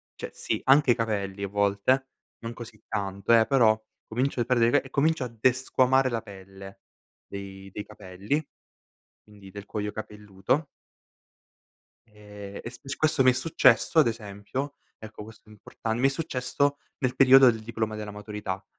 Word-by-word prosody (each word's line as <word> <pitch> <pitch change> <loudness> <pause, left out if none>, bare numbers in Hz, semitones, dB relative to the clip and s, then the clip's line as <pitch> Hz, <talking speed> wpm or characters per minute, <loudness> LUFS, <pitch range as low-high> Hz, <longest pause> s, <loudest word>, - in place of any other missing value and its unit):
cioè - - -7
sì - - -3
anche 135 -1 +5
i - - +3
capelli 100 -4 -3
a - - -1
volte, 100 +6 +1 0.3
non 115 0 -6
così 115 -3 -11
tanto, 100 +1 -1
eh, 110 - +4
però 115 -5 +4 0.3
comincio 125 +3 -1
a 120 - +1
perdere 120 -2 +3
i - - 0
cape 145 -2 +2
e - - -17
comincio 150 0 +1
a - - -3
desquamare 130 +2 +2
la 115 -2 -2
pelle 95 0 -12 0.5
dei 95 -1 -9
dei 105 - -6
capelli, 100 +9 -4 0.8
quindi 100 -2 -15
del 100 +1 -10
cuoio 105 0 -4
capelluto. 105 +6 -3 1.4
Ehm, 105 -2 -11
e 120 - -6
sp 125 - -15
e - - -9
s 135 - -3
questo 155 -3 +2
mi 130 - +6
è - - +2
successo 135 0 +3
ad 150 - +7
esempio, 115 +5 -4 0.2
ecco 110 -1 -10
questo 110 0 -16
è - - -14
importan 110 +2 -5
mi 135 - +3
è - - -1
successo 140 -1 -1 0.2
nel 130 -3 -1
periodo 135 -1 +8
del 110 -1 -5
diploma 110 -1 -3
della 105 -1 -6
maturità, 105 -2 -6
110 Hz, 170 wpm, -26 LUFS, 100-130 Hz, 1.4 s, periodo